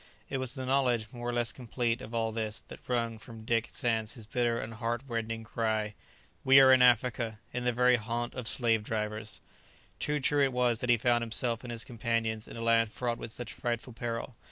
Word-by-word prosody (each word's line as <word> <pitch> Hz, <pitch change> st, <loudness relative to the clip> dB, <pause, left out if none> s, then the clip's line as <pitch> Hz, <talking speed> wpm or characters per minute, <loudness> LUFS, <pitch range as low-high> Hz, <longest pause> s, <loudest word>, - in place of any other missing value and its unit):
It 135 Hz, -, -1 dB
was 130 Hz, +1 st, -2 dB
the 130 Hz, -1 st, -4 dB
knowledge, 125 Hz, -4 st, +1 dB
more 120 Hz, -1 st, -5 dB
or -, -, -1 dB
less 120 Hz, 0 st, +1 dB
complete, 120 Hz, -1 st, -2 dB
of 110 Hz, -, -8 dB
all 115 Hz, -1 st, 0 dB
this, 110 Hz, -1 st, -1 dB
that -, -, -9 dB
wrung 115 Hz, -2 st, -1 dB
from 110 Hz, -1 st, -11 dB
Dick 115 Hz, 0 st, +1 dB
Sands 115 Hz, -2 st, 0 dB
his 115 Hz, -4 st, -9 dB
bitter 120 Hz, +1 st, 0 dB
and 115 Hz, -, -5 dB
heart 115 Hz, +2 st, -2 dB
rending 115 Hz, -2 st, -3 dB
cry: 110 Hz, -1 st, -1 dB, 0.5 s
"We 135 Hz, +1 st, +8 dB
are 130 Hz, -1 st, +8 dB
in 130 Hz, -, +6 dB
Africa! 120 Hz, -2 st, +3 dB, 0.2 s
in 125 Hz, 0 st, -2 dB
the 125 Hz, -, +3 dB
very 125 Hz, +1 st, +4 dB
haunt 120 Hz, +2 st, -3 dB
of 125 Hz, -3 st, -5 dB
slave 115 Hz, -3 st, +2 dB
drivers!" 110 Hz, 0 st, -4 dB, 0.6 s
Too 150 Hz, 0 st, 0 dB
true 145 Hz, +1 st, +3 dB
it 135 Hz, -2 st, +1 dB
was 125 Hz, -2 st, +2 dB
that 125 Hz, -, -3 dB
he 120 Hz, -, +6 dB
found 120 Hz, +1 st, +2 dB
himself 115 Hz, 0 st, -1 dB
and 120 Hz, -, -6 dB
his 115 Hz, -1 st, -2 dB
companions 115 Hz, -2 st, -2 dB
in -, -, -9 dB
a 115 Hz, -, -4 dB
land 115 Hz, -1 st, +3 dB
fraught 120 Hz, +1 st, -2 dB
with 115 Hz, -, -5 dB
such 120 Hz, 0 st, -4 dB
frightful 120 Hz, +1 st, -3 dB
peril. 115 Hz, +1 st, -4 dB
115 Hz, 215 wpm, -30 LUFS, 115-125 Hz, 0.6 s, We